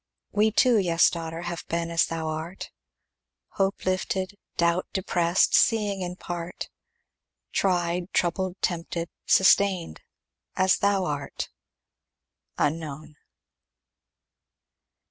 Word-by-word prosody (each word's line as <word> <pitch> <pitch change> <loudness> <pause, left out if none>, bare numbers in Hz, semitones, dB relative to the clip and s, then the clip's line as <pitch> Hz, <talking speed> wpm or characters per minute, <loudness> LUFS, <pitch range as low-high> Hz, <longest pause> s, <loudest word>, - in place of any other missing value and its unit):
We 210 +1 +3
too, 230 +1 +4
yes, 170 -3 +4
daughter, 165 0 -5
Have 175 -1 -4
been 170 0 -2
as 165 - +3
thou 165 -1 -3
art. 160 +4 -5 0.8
Hope 195 0 -1
lifted, 185 +1 -1 0.2
doubt 170 +1 +2
depressed, 175 -2 +2
Seeing 205 -3 +3
in 180 0 -4
part, 175 -1 -6 0.8
Tried, 175 -1 0
troubled, 185 +1 0
tempted, 170 -1 -2 0.2
Sustained, 190 - +3 0.5
as 185 0 +3
thou 200 -2 +2
art. 145 -3 -4 1.1
Unknown. 155 0 -2
175 Hz, 95 wpm, -26 LUFS, 165-190 Hz, 1.1 s, too